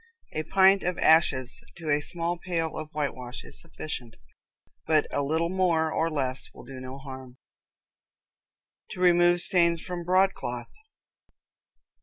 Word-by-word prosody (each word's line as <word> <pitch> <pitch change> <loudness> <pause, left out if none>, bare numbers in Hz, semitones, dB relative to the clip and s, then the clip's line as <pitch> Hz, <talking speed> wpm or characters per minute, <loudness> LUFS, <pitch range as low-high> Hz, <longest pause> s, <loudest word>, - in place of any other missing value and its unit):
A 155 - -2
pint 190 +4 +4
of 180 0 -2
ashes 135 -6 +2
to 160 -3 -4
a 145 0 +2
small 170 +2 -2
pail 165 -3 -3
of 155 -1 -6
whitewash 130 -5 -5
is - - -8
sufficient, 135 -8 -7 0.7
but 155 -2 +3
a 145 - 0
little 160 +4 0
more 170 -4 +1
or 165 +1 0
less 130 -4 -2
will - - -12
do 130 +1 -10
no 130 +1 -8
harm. 130 -2 -10 1.6
To - - -9
Remove 175 -1 +5
Stains 170 -2 +5
from 175 0 -6
Broadcloth. 180 -10 0
160 Hz, 135 wpm, -26 LUFS, 135-175 Hz, 1.6 s, Remove